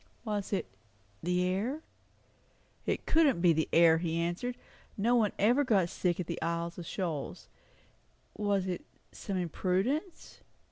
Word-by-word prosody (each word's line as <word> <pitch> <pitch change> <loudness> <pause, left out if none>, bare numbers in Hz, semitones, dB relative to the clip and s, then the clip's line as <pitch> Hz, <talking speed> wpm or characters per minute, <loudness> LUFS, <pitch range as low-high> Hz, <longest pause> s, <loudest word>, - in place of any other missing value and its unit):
Was 205 -3 -2
it 200 - 0 0.6
the 180 +1 +1
air? 225 +12 -1 1.0
It - - -1
couldn't 315 - +4
be 170 -1 +5
the 160 0 0
air, 165 -1 +6
he 165 -1 -1
answered; 175 +9 -2 0.4
nobody 225 0 +3
ever 240 +8 +4
got 200 -9 +2
sick 175 0 -1
at 180 - -1
the 170 0 -5
Isles 170 +1 -2
of 170 - -7
Shoals. 165 -7 -4 0.9
Was 200 -2 +1
it 180 -2 -3 0.3
some 195 -2 -4
imprudence? 190 - -1
185 Hz, 135 wpm, -31 LUFS, 170-220 Hz, 1.0 s, air